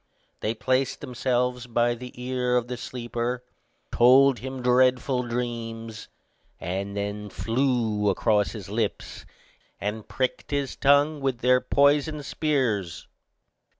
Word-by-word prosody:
They 110 Hz, +2 st, -2 dB
placed 130 Hz, +3 st, 0 dB
themselves 125 Hz, 0 st, -1 dB
by 120 Hz, 0 st, +2 dB
the 125 Hz, +1 st, -8 dB
ear 125 Hz, 0 st, 0 dB
of 120 Hz, -1 st, -1 dB
the 125 Hz, -, -4 dB
sleeper, 120 Hz, 0 st, -4 dB, 0.5 s
told 130 Hz, +2 st, +5 dB
him 130 Hz, 0 st, -6 dB
dreadful 125 Hz, +1 st, +3 dB
dreams 115 Hz, -2 st, -4 dB, 0.5 s
and 100 Hz, +3 st, -4 dB
then 100 Hz, +1 st, -4 dB
flew 115 Hz, -2 st, 0 dB
across 105 Hz, +1 st, +1 dB
his 105 Hz, -5 st, -8 dB
lips, 105 Hz, +1 st, -3 dB, 0.5 s
and 105 Hz, +1 st, -4 dB
pricked 130 Hz, -1 st, -2 dB
his 140 Hz, -2 st, -2 dB
tongue 145 Hz, +2 st, +3 dB
with 130 Hz, -3 st, -1 dB
their 125 Hz, +1 st, +4 dB
poisoned 145 Hz, +1 st, +2 dB
spears. 120 Hz, -, -1 dB
125 Hz, 115 wpm, -25 LUFS, 115-130 Hz, 0.5 s, told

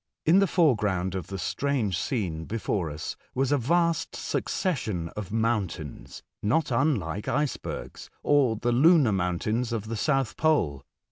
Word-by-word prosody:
In 170 Hz, +5 st, +6 dB
tbe 195 Hz, -2 st, +3 dB
foreground 105 Hz, -, +2 dB
of 95 Hz, -3 st, -4 dB
tbe 95 Hz, -1 st, -5 dB
strange 130 Hz, -9 st, -1 dB
scene 90 Hz, -, -2 dB
before 100 Hz, -4 st, -2 dB
us 75 Hz, +1 st, -5 dB, 0.2 s
was 135 Hz, +1 st, +1 dB
a 145 Hz, -, +4 dB
vast 170 Hz, +5 st, +1 dB
succession 110 Hz, -, -2 dB
of 100 Hz, +1 st, -7 dB
mountains, 105 Hz, -, -2 dB, 0.2 s
not 135 Hz, +8 st, +1 dB
unlike 115 Hz, -, 0 dB
icebergs, 140 Hz, +2 st, -3 dB
or 140 Hz, -6 st, +3 dB
tbe 120 Hz, +2 st, 0 dB
lunar 160 Hz, -7 st, +6 dB
mountains 100 Hz, +6 st, -1 dB
of 115 Hz, -3 st, -2 dB
tbe 115 Hz, 0 st, -4 dB
Soutb 135 Hz, -2 st, 0 dB
pole. 85 Hz, -, +1 dB
115 Hz, 140 wpm, -27 LUFS, 95-145 Hz, 0.2 s, In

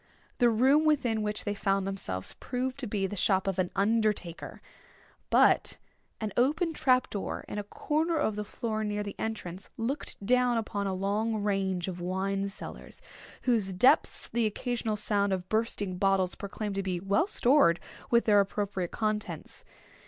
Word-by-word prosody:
The 240 Hz, -, +5 dB
room 265 Hz, +7 st, +4 dB
within 260 Hz, -8 st, +2 dB
which 210 Hz, 0 st, -1 dB
they 205 Hz, -, 0 dB
found 195 Hz, -1 st, 0 dB
themselves 95 Hz, -, -4 dB
proved 255 Hz, +1 st, -3 dB
to 255 Hz, -, -4 dB
be 205 Hz, -2 st, -1 dB
the 195 Hz, -, -4 dB
shop 190 Hz, -1 st, +2 dB
of 195 Hz, -1 st, -1 dB
an 180 Hz, -1 st, +1 dB
undertaker; 205 Hz, -4 st, 0 dB, 0.7 s
but -, -, +4 dB, 0.4 s
an 215 Hz, -3 st, -3 dB
open 310 Hz, +7 st, +2 dB
trap 255 Hz, -5 st, +2 dB
door, 200 Hz, -, -4 dB
in 205 Hz, -, -4 dB
a -, -, -3 dB
corner 315 Hz, +10 st, -1 dB
of 220 Hz, -8 st, 0 dB
the 210 Hz, -, -3 dB
floor 215 Hz, +1 st, -3 dB
near 210 Hz, 0 st, -2 dB
the 200 Hz, -, -5 dB
entrance, 195 Hz, -5 st, -5 dB
looked 230 Hz, -3 st, -3 dB
down 250 Hz, +1 st, +3 dB
upon 205 Hz, -3 st, -2 dB
a 190 Hz, -, -1 dB
long 210 Hz, +3 st, -1 dB
range 195 Hz, -3 st, 0 dB
of 180 Hz, -2 st, -5 dB
wine 195 Hz, +2 st, -1 dB
cellars, 195 Hz, -, -6 dB, 0.4 s
whose 220 Hz, -7 st, +1 dB
depths 215 Hz, +9 st, +3 dB
the 235 Hz, -2 st, +1 dB
occasional 225 Hz, 0 st, -2 dB
sound 205 Hz, -2 st, +1 dB
of 185 Hz, -1 st, -3 dB
bursting 205 Hz, -4 st, -1 dB
bottles 195 Hz, -2 st, +2 dB
proclaimed 205 Hz, +1 st, -5 dB
to 195 Hz, -, -1 dB
be 185 Hz, -2 st, -2 dB
well 200 Hz, -, +1 dB
stored 245 Hz, -, +4 dB, 0.3 s
with 235 Hz, 0 st, +4 dB
their 205 Hz, -2 st, +5 dB
appropriate 200 Hz, -2 st, -1 dB
contents. 215 Hz, -1 st, -3 dB
210 Hz, 165 wpm, -29 LUFS, 195-235 Hz, 0.7 s, The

